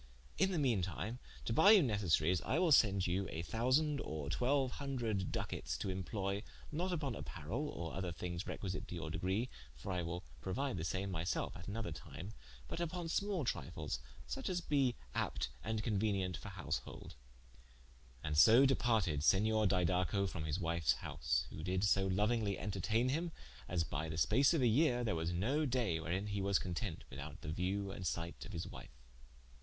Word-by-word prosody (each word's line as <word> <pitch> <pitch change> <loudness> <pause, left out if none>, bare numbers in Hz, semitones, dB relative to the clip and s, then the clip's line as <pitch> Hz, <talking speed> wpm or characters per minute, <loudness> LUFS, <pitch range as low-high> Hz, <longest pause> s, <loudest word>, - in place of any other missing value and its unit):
In 190 - +4
the 180 - 0
mean 125 -10 +2
time 100 +7 -3 0.3
to 115 - 0
buye 195 - +8
you 195 - +6
necessaries, 90 - +2
I 135 - 0
will 175 -2 +3
sende 100 -8 +5
you 95 +2 0
a 80 - -4
thousande, 135 - +2
or 75 -2 -4
twelue 130 - +2
hundred 120 -9 -2
Ducates, - - -3
to - - -3
imploye 100 +1 -2 0.3
not 170 +5 -1
vpon 150 -9 -1
apparell, 95 - -4
or 85 -1 -5
other 95 -2 -2
things 85 +2 -4
requisite 95 -2 -4
to - - -6
your 80 -2 -4
degree 95 +9 0 0.3
(for 65 +10 -6
I 90 -1 0
will 85 +2 -4 0.2
prouide 130 +8 -1
the - - -3
same 95 +5 -2
my 80 -3 -2
selfe 85 -6 -1
at 90 - -9
an 100 +2 -3
other 115 - -3
time) 100 +5 -8 0.3
but - - -4
vpon 170 0 -2
small 200 -7 0
trifles, 60 - -3 0.3
such 65 - -3
as 180 -1 0
be 140 -7 +2 0.2
apt - - -1
and 110 -1 -1
conuenient 100 -4 0
for 60 - -7
householde." - - -5 1.1
And 75 -1 -1
so 115 - +8
departed 110 - +2
Senior 110 +5 +4
Didaco 90 +1 +2
from 85 -4 -4
his 75 +1 -1
wiue's 85 -6 +2
house: - - -1
who 80 - -7
did 90 +3 0
so 100 -1 +3
louingly 105 +1 +1
interteigne 110 +5 0
him 165 +4 -1 0.4
as 85 -2 +1
by 80 +1 -3
the 80 - -4
space 120 - +4
of 145 - +2
a - - +5
yeare, 125 +1 +3
there 110 - +1
was 80 +1 -1
no 120 - +1
daye 120 -10 +1
wherein 85 +5 -2
he 100 -1 -2
was 100 0 +3
content 90 -1 -3
without 70 +1 -7
the 75 - -5
view 95 +4 -1
and 90 -2 -4
sight 85 0 -3
of - - -9
his - - -3
wife. - - -11
100 Hz, 185 wpm, -36 LUFS, 85-125 Hz, 1.1 s, buye